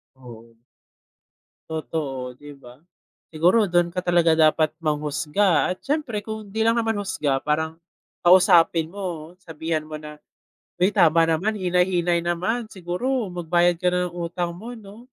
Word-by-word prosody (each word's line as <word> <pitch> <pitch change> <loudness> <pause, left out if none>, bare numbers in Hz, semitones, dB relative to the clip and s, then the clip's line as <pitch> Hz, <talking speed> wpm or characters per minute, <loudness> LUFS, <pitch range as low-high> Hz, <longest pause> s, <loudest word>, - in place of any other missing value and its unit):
Oo. 115 -3 -14 1.1
Totoo, 145 -5 -4
di 145 +3 -13
ba? 125 -1 -16 0.5
Siguro 180 +7 +3
dun 175 -1 +1
ka 180 - -3
talaga 175 -2 +3
dapat 155 0 +4
manghusga 155 +4 +1
at 185 - -5
siyempre 275 -8 -2
kung 220 -1 -7
di 220 +3 -2
lang 230 +1 +3
naman 225 -1 0
husga 140 -8 -2
parang 160 +1 -1 0.5
kausapin 175 -2 +5
mo 175 -3 -7
sabihan 160 -3 -4
mo 155 0 -8
na, 150 0 -10 0.7
"Uy 190 - +5
tama 165 -3 +4
naman, 165 +7 +1
hinay-hinay 180 -2 +1
naman. 215 +7 -1
Siguro 200 +5 -3
magbayad 175 0 +1
ka 180 - -3
na 180 -1 0
ng 175 - -10
utang 170 +1 -3
mo 235 +5 -8
'no." 220 +2 -13
175 Hz, 140 wpm, -23 LUFS, 155-195 Hz, 1.1 s, kausapin